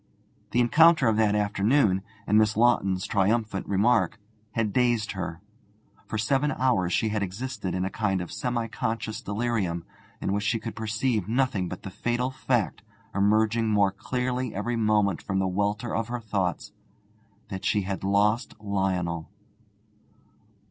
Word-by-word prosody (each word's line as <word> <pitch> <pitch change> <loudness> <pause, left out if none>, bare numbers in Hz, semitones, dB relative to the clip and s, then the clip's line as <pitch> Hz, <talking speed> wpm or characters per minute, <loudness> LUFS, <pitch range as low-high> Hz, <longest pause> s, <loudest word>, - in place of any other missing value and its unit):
The 120 - +1
encounter 155 +3 +5
of 110 - +3
that 105 -2 +3
afternoon, 105 0 +2 0.2
and 105 - +1
Miss 110 0 +2
Lawton's 100 -6 +3
triumphant 105 0 0
remark, 110 +3 +2 0.3
had 110 -3 0
dazed 120 -4 +2
her. 90 -3 -5 0.7
For 110 - -3
seven 135 +6 +1
hours 100 -9 +1
she 110 - +1
had 105 -1 -1
existed 100 0 -4
in 90 0 -1
a 95 - -3
kind 100 -4 0
of 90 - -6
semi 120 -3 -2
conscious 110 0 -3
delirium, 100 -6 -2 0.3
in 95 - -1
which 105 0 -1
she 115 +2 +1
could 115 0 -6
perceive 110 -1 -1
nothing 120 -7 +1
but 90 - -7
the 95 - -6
fatal 120 +6 -1
fact, 120 -8 -1 0.3
emerging 110 +3 +2
more 100 -2 +3
clearly 125 +4 -3
every 120 +5 -1
moment 105 -4 +2
from 95 - -2
the 95 - +1
welter 105 +5 -1
of 115 0 -1
her 120 0 -3
thoughts, 100 -6 -2 0.8
that 95 -1 -6
she 105 0 +1
had 95 0 -4
lost 105 +4 +1
Lionel. 95 -5 -1
105 Hz, 150 wpm, -26 LUFS, 95-120 Hz, 0.8 s, encounter